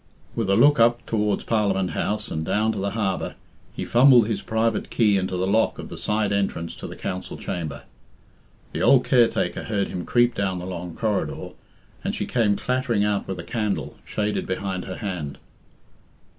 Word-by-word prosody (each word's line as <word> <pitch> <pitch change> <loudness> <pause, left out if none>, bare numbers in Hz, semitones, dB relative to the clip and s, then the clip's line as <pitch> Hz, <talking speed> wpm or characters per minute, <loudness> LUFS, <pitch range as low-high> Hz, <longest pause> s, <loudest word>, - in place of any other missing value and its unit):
With 115 -4 -1
a 100 - +4
look 140 +5 +5
up 120 +1 +4
towards 105 -2 0
Parliament 100 -4 +1
House 105 0 -2
and 80 - -2
down 110 +6 +1
to - - -4
the 100 +1 -1
harbour, 100 -3 -2 0.4
he - - -5
fumbled 120 -2 +6
his 105 -3 -2
private 110 0 0
key 105 -4 +3
into 95 -1 -1
the 90 - 0
lock 110 +4 +2
of - - -7
the - - -7
side 105 -1 0
entrance 95 -4 -1
to - - -7
the - - -8
council 90 0 -5
chamber. 80 -5 -5 0.9
The - - -2
old 130 -2 +5
caretaker 120 -3 +2
heard 100 -3 -1
him 90 - -4
creep 120 0 +3
down 95 -3 -1
the 90 - -5
long 90 -2 -6
corridor, 105 -3 -2 0.5
and - - -2
she - - -2
came 110 -4 +2
clattering 120 -2 0
out 105 -1 0
with 95 - -4
a 85 - -6
candle, 100 - -2
shaded 105 0 -2
behind 95 -1 -3
her 95 - -5
hand. 90 -9 -4
105 Hz, 185 wpm, -24 LUFS, 95-115 Hz, 0.9 s, fumbled